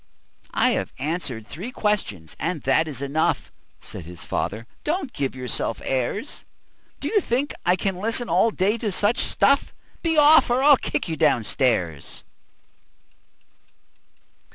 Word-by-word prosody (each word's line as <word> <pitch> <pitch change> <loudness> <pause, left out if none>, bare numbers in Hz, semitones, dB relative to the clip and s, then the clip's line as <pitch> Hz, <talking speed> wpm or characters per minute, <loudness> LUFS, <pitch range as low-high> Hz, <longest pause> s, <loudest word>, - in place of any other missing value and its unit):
"I - - +4
have - - -2
answered 140 -6 -3
three 190 +10 -7
questions, 150 - -2
and 165 -3 -2
that 135 +5 +2
is 140 -3 -5
enough," 145 +3 0 0.3
Said 85 - -9
his 85 0 -9
father. 110 +3 -3 0.2
"Don't 305 -4 -2
give 135 -3 -2
yourself 125 -3 -3
airs! 135 - -2 0.6
Do - - -3
you 420 -2 +2
think 265 +2 -1
I 180 - +5
can 190 0 -2
listen 230 +5 0
all 190 +5 +3
day 210 +2 0
to 215 -2 -2
such 205 +5 +1
stuff? 280 0 +2 0.3
Be 325 -2 0
off, 300 0 +7
or 250 +2 +2
I'll 290 -1 +8
kick - - -3
you 160 -2 -3
down 145 -7 +3
stairs. 90 - -1
180 Hz, 145 wpm, -23 LUFS, -, 0.6 s, I'll